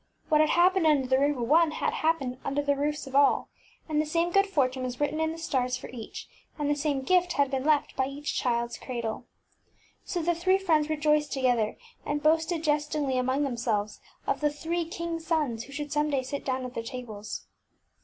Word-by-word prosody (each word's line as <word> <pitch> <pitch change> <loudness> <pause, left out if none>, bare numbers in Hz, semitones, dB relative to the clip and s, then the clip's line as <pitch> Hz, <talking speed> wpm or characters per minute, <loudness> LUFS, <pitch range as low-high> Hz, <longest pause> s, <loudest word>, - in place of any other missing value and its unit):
What 305 -1 +5
had 310 - +3
happened 360 -1 +4
under 290 -4 +4
the 260 - +3
Wbtn - - +3
<HHeabec0 280 - +4
roof 245 - -3
of - - -2
one 320 +3 +5
had - - -1
happened 295 -6 0
under 280 +1 -1
the 285 0 +2
roofs 295 +2 -2
of 270 0 -8
all, 280 0 +4 0.4
and 305 -2 +1
the 305 - -3
same 335 +3 +1
good 395 +2 +4
fortune 265 -8 0
was 250 -1 -4
written 295 +1 0
in 320 0 +1
the 325 - -7
stars 255 -6 -1
for - - -9
each, 235 -3 -8 0.3
and 295 -2 -1
the 290 - +3
same 285 -2 -1
gift 360 +3 +3
had 285 -1 +1
been 265 -1 -1
left 300 -1 +2
by 265 - +1
each 285 +2 -3
childŌĆÖs 235 -1 -1
cradle. 235 -2 -4 0.8
So 350 -2 -3
the 345 +2 +2
three 370 +3 +2
friends 315 -6 +2
rejoiced 300 -1 +1
to 270 - -2
gether, 240 -4 +1 0.3
and 290 0 -2
boasted 320 +1 +2
jest 295 -1 +1
ingly 275 -4 0
among 260 +3 +1
themselves 230 -5 -2 0.2
of - - -1
the 295 - +3
three 330 +3 -3
kingsŌĆÖ 335 -1 -4
sons 300 -9 -1
who - - -14
should 290 +1 -5
some 300 0 +1
day 275 -3 0
sit 280 +2 -5
down 260 -1 -2
at 250 - -7
their 230 - -3
tables. 230 -4 -7
290 Hz, 225 wpm, -28 LUFS, 255-320 Hz, 0.8 s, What